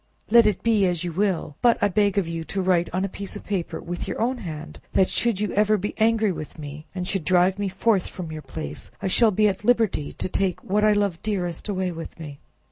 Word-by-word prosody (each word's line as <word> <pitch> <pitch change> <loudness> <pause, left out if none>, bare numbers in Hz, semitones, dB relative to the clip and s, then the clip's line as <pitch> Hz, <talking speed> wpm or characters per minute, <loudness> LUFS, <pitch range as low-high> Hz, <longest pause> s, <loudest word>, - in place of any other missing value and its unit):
let 235 -1 +7
it 205 -4 0
be 215 -4 +3
as 175 -2 -1
you 175 - -3
will; 185 -6 -1
but 240 -1 +5
I - - +3
beg 205 0 +1
of 195 -4 +2
you 165 0 -4
to 195 - -2
write 180 -2 +2
on 185 +2 0
a - - -1
piece 200 0 -8
of - - -7
paper 190 -5 -3
with 175 +1 -5
your - - -4
own 245 +2 0
hand, 160 -4 -7
that, 190 - +3
should 235 -5 +1
you 210 -2 -1
ever 210 +1 +3
be 205 +2 -3
angry 220 -1 +3
with 155 -3 -7
me, 150 +1 -8
and 180 -1 -3
should 195 -3 -1
drive 185 +3 +3
me 200 -1 0
forth 190 +1 +1
from 170 -4 -7
your 155 -1 -6
palace, 155 +1 -7
I - - -6
shall 225 +4 +4
be 210 +1 +3
at 195 0 -2
liberty 220 -10 +2
to - - -3
take 185 -1 -1
whatever 210 +2 +2
I - - +5
love 200 -5 0
dearest 185 -3 -2
away 185 -2 -1
with 165 0 -8
me." 145 -3 -8
190 Hz, 245 wpm, -24 LUFS, 175-210 Hz, -, let